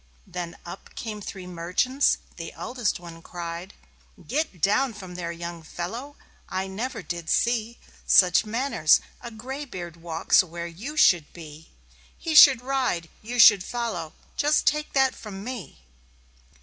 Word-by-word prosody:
Then 170 -2 -6
up 175 - -10
came 215 -3 -5
three 190 -2 -7
merchants. 180 +11 +1 0.2
The - - -7
eldest 240 -8 -2
one 170 -1 -11
cried; 170 +2 -7 0.5
"Get 290 - -2
down 230 - +2
there, 180 -4 -6
young 170 0 -7
fellow! 230 - -6 0.3
I 190 +1 -2
never 225 +3 -5
did 170 0 -5
see 235 0 +1 0.3
Such 180 0 +6
manners: 225 - +3 0.2
a 240 - -7
gray 260 +6 -6
beard 175 - -8
walks 165 -1 +3
where 170 -1 -7
you 215 - -7
should 170 - +4
be. 160 -2 -12 0.5
He 325 - -3
should 270 -5 +9
ride, 250 -11 -1
you 240 +3 -5
should 205 -5 +8
follow. 220 -10 -4 0.2
Just 300 +1 +2
take 300 0 +1
that 270 -1 +3
from 200 -3 -9
me!" 240 - -7
195 Hz, 140 wpm, -25 LUFS, 170-250 Hz, 0.5 s, should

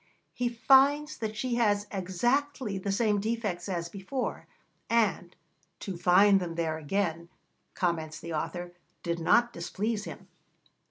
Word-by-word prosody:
He 245 -1 -1
finds 275 +6 +4
that 220 -1 -4
she 250 +2 -1
has 205 -3 +2
exactly 215 +4 -1
the 195 +1 -2
same 210 0 +2
defects 210 -5 -2
as 170 -2 -2
before, 200 +9 -4 0.4
and 210 -6 +1 0.4
'to 195 - -5
find 190 +3 +5
them 170 -2 -4
there 160 -2 -1
again,' 170 +1 -2 0.5
comments 160 -3 -1
the 170 0 -6
author, 175 +3 -4 0.3
'did 170 -1 -2
not 235 +8 +3
displease 210 +5 -3
him. - - -9
200 Hz, 130 wpm, -29 LUFS, 175-235 Hz, 0.5 s, find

